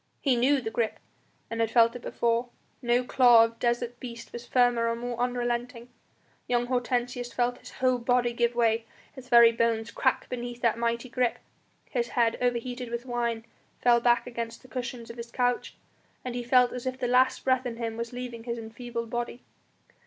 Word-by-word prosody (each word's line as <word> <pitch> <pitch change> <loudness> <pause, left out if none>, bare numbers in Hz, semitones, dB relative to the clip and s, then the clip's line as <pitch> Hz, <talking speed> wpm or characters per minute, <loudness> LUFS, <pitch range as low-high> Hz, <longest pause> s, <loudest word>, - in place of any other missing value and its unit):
He 270 -4 +2
knew 265 +3 +3
the 220 -2 -4
grip 225 -1 -1 0.5
and 230 - -3
had 225 - +1
felt 230 0 +4
it 245 - -7
before; 235 +1 0 0.3
no 240 +1 +2
claw 245 -2 +6
of 230 0 -8
desert 240 0 -1
beast 235 -2 -9
was 240 0 -8
firmer 245 -2 +3
or 230 - 0
more 240 +1 -4
unrelenting. 245 0 -2 0.6
Young 245 0 +1
Hortensius 245 0 -1
felt 245 +1 0
his - - -12
whole 255 -1 +1
body 245 0 +1
give 235 0 +1
way, 230 -1 +2 0.3
his 260 -2 -12
very 235 -1 +8
bones 230 -1 0
crack 260 +1 0
beneath 245 -1 -5
that 230 -1 +2
mighty 235 +1 -1
grip. 245 0 0 0.5
His 240 -3 -1
head, 235 -2 +1
overheated 245 0 -1
with 235 +1 -4
wine, 235 -2 -2 0.3
fell 240 -1 +5
back 240 0 +3
against 235 -1 -6
the - - -14
cushions 245 -2 -5
of 230 - -13
his 235 0 -7
couch, 245 0 -1 0.5
and 250 - -3
he 245 - -3
felt 250 0 +4
as 250 +1 -5
if 255 0 -2
the 250 - -2
last 255 +1 +3
breath 260 -1 +2
in 230 -1 -5
him 230 -1 -3
was 235 0 -4
leaving 245 -2 -7
his 235 -1 -3
enfeebled 230 0 -6
body. 240 0 -4
240 Hz, 190 wpm, -28 LUFS, 235-245 Hz, 0.6 s, very